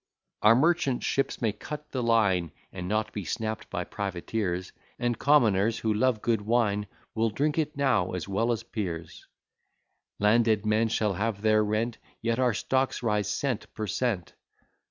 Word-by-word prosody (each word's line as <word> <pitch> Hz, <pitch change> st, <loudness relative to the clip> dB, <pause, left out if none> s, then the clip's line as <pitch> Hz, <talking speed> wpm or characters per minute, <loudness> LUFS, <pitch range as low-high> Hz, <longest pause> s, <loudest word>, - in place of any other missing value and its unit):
Our 110 Hz, +2 st, +7 dB
merchant 140 Hz, -2 st, +2 dB
ships 135 Hz, -2 st, -1 dB
may 110 Hz, -, +3 dB
cut 150 Hz, +7 st, -8 dB
the 130 Hz, -, -2 dB
line, 105 Hz, -8 st, +2 dB, 0.2 s
And 90 Hz, -1 st, -5 dB
not 110 Hz, +2 st, -1 dB
be 105 Hz, -, -4 dB
snapt 110 Hz, +6 st, -3 dB
by -, -, -2 dB
privateers. 95 Hz, -1 st, -3 dB, 0.3 s
And 120 Hz, -2 st, -1 dB
commoners 115 Hz, -6 st, +4 dB
who 110 Hz, -1 st, 0 dB
love 110 Hz, 0 st, +1 dB
good 115 Hz, -3 st, +1 dB
wine 105 Hz, -2 st, +1 dB, 0.3 s
Will 115 Hz, 0 st, +1 dB
drink 145 Hz, +8 st, 0 dB
it 150 Hz, -1 st, -2 dB
now 125 Hz, -11 st, +2 dB
as 90 Hz, -1 st, -4 dB
well 110 Hz, +5 st, +1 dB
as 115 Hz, -1 st, -2 dB
peers: 90 Hz, -8 st, -5 dB, 0.9 s
Landed 110 Hz, 0 st, +3 dB
men 110 Hz, +1 st, +3 dB
shall 110 Hz, -2 st, 0 dB
have 100 Hz, +1 st, -2 dB
their 110 Hz, 0 st, +4 dB
rent, 110 Hz, +3 st, -1 dB, 0.2 s
Yet 115 Hz, +1 st, -1 dB
our 125 Hz, -4 st, +2 dB
stocks 130 Hz, +3 st, 0 dB
rise 105 Hz, -3 st, +1 dB
_cent, 130 Hz, -6 st, -2 dB
per 110 Hz, -, -3 dB
cent. 105 Hz, -5 st, -1 dB
110 Hz, 160 wpm, -28 LUFS, 105-120 Hz, 0.9 s, Our